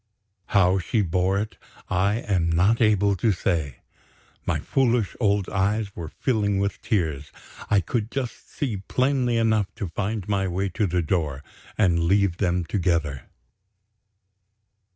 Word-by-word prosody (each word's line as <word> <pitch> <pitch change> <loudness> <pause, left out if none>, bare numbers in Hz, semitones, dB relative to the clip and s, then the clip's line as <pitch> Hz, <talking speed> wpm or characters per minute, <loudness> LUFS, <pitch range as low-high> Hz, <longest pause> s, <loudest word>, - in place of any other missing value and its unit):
How 95 -2 +3
she 105 +5 0
bore 90 +2 +1
it 105 +2 -3 0.3
I 95 +3 +1
am 90 -5 0
not 95 +8 +3
able 100 -2 +3
to 110 +4 +2
say. 80 -9 -1 0.7
My - - +1
foolish 120 -6 +1
old 100 -4 +2
eyes 100 +1 -1
were 85 -2 -5
filling 105 - 0
with 100 +1 -1
tears. 80 -8 -1 0.4
I 100 -1 +4
could 110 +5 -2
just 130 -2 -5
see 125 -8 -2
plainly 125 +3 0
enough 110 -3 +2
to 105 -6 -4
find 100 +3 -3
my 100 -2 0
way 95 +2 -1
to 100 +3 0
the 90 0 0
door, 75 -5 -1 0.3
and 85 -5 +3
leave 95 -1 +2
them 90 -2 0
together. 85 -7 -1
100 Hz, 140 wpm, -24 LUFS, 90-110 Hz, 0.7 s, I